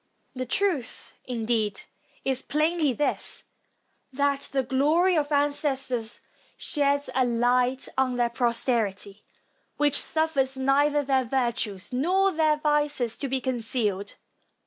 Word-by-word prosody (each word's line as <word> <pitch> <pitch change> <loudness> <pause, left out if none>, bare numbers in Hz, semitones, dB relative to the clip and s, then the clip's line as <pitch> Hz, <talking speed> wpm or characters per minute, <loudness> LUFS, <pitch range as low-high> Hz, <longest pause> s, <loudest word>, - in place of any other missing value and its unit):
The 255 -1 -5
truth, 335 -5 -1
indeed, 225 -4 -1 0.4
is 265 -1 0
plainly 310 0 +1
this, 290 +4 -1 0.7
that 280 +1 -1
the 270 -1 +1
glory 305 +8 +2
of 300 -1 0
ancestors 275 -5 -1 0.4
sheds 285 -2 0
a 260 - +2
light 245 +2 +1
on 255 -1 +1
their 240 -1 +1
posterity, 230 -4 -1 0.5
which 295 -1 +3
suffers 280 -5 +1
neither 285 +2 +2
their 265 -2 +1
virtues 235 -5 -2
nor 370 +9 +2
their 310 -2 +2
vices 295 -6 0
to 280 - -3
be 265 0 -1
concealed. 225 -5 -2
265 Hz, 115 wpm, -26 LUFS, 240-295 Hz, 0.7 s, which